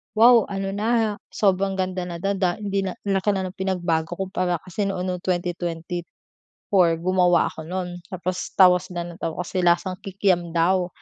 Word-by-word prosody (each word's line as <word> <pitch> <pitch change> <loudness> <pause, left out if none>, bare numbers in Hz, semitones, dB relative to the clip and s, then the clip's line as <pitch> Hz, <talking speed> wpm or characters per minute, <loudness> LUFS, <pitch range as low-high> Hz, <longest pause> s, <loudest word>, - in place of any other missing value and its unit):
"wow 230 0 +7
ano 195 -1 -3
na, 210 +3 -2
ha," 220 -1 +1 0.2
sobrang 195 -1 +2
ganda 185 -1 -2
na 175 - -5
daw 195 - 0
da 180 -2 +1
hindi 200 -1 -1
na 185 - -3
ang 195 -1 +1
laki 205 +2 +1
na 190 - -1
ng 185 - -16
pinagbago 175 -3 -1
kumpara 185 -1 -1
kasi 190 +3 -3
noon 185 -2 -2
no'ng 180 -1 -2
2024 175 0 -2
gumawa 180 -1 +3
ako 160 0 -9
no'n, 180 0 -4
tapos 185 0 -4
tawa 180 -2 +7
sila 175 -1 -6
nang 170 - -10
tawa 165 +2 -3
kasi 185 +1 -3
lasang 180 +2 +2
kikiam 185 -3 0
daw, 180 +2 +2
185 Hz, 180 wpm, -23 LUFS, 175-195 Hz, 0.2 s, wow